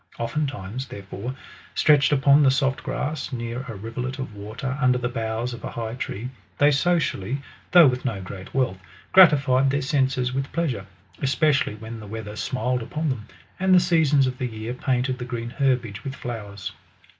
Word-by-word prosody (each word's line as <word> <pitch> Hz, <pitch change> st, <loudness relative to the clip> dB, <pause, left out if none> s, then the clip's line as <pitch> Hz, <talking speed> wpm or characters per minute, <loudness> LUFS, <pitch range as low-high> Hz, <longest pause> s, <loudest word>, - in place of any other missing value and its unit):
Oftentimes, 130 Hz, -2 st, -3 dB
therefore, 100 Hz, +2 st, -6 dB, 0.4 s
stretched 150 Hz, -2 st, +5 dB
upon 140 Hz, 0 st, +5 dB
the 140 Hz, -, +6 dB
soft 135 Hz, 0 st, +1 dB
grass, 150 Hz, 0 st, -3 dB
near 120 Hz, 0 st, -4 dB
a 115 Hz, -, -6 dB
rivulet 120 Hz, +6 st, -5 dB
of 130 Hz, -5 st, -5 dB
water, 110 Hz, +6 st, -5 dB
under 125 Hz, -1 st, +4 dB
the 125 Hz, 0 st, -1 dB
boughs 115 Hz, 0 st, -2 dB
of 120 Hz, -, -9 dB
a.high 115 Hz, -1 st, -4 dB
tree, 125 Hz, -1 st, -5 dB, 0.3 s
they 145 Hz, +1 st, +5 dB
socially, 140 Hz, -, +1 dB, 0.3 s
though 175 Hz, -2 st, +8 dB
with 125 Hz, -2 st, +2 dB
no 115 Hz, -7 st, -2 dB
great 95 Hz, 0 st, -8 dB
wealth, 125 Hz, -9 st, 0 dB, 0.3 s
gratified 140 Hz, -7 st, +6 dB
their 140 Hz, +1 st, +1 dB
senses 130 Hz, -3 st, +1 dB
with 135 Hz, +1 st, -2 dB
pleasure, 130 Hz, -, -2 dB, 0.3 s
especially 140 Hz, -4 st, +2 dB
when 110 Hz, +1 st, -8 dB
the 105 Hz, -, -9 dB
weather 105 Hz, 0 st, -6 dB
smiled 125 Hz, +1 st, -1 dB
upon 150 Hz, +7 st, -2 dB
them, 120 Hz, -4 st, -4 dB, 0.3 s
and 190 Hz, 0 st, +4 dB
the -, -, +8 dB
seasons 160 Hz, -6 st, +3 dB
of 130 Hz, 0 st, -3 dB
the 130 Hz, -, -1 dB
year 110 Hz, +1 st, -5 dB
painted 130 Hz, 0 st, -1 dB
the -, -, -4 dB
green 120 Hz, -1 st, -4 dB
herbage 125 Hz, -6 st, 0 dB
with 135 Hz, 0 st, -5 dB
flowers. 105 Hz, -6 st, -6 dB
125 Hz, 170 wpm, -24 LUFS, 115-140 Hz, 0.4 s, though